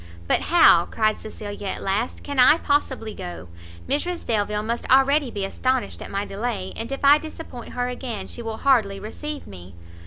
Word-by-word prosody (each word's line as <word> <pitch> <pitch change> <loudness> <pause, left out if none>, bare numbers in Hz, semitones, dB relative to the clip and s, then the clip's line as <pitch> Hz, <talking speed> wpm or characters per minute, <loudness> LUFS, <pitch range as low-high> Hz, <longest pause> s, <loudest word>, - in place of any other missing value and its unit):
"But - - +3
how," 325 - +6
cried 215 -1 +1
Cecilia 205 -2 -7
at - - -4
last, 200 +5 -1
"can 285 -2 -3
I 255 +5 +7
possibly 265 -8 -1
go? 175 - -8 0.4
Mrs 335 +6 -2
Delvile 210 -2 0
must 235 +2 -3
already 270 +1 +4
be 200 -4 -3
astonished 255 +5 -1
at - - -7
my 200 +1 -2
delay, 200 -2 -4
and 230 +3 -5
if 275 +1 -2
I 290 +2 +7
disappoint 315 -6 -9
her 245 0 -1
again 245 -5 -5
she - - -7
will 225 -1 -4
hardly 220 -8 +2
receive 300 +8 -6
me." 90 -2 -12
230 Hz, 180 wpm, -23 LUFS, 205-275 Hz, 0.4 s, I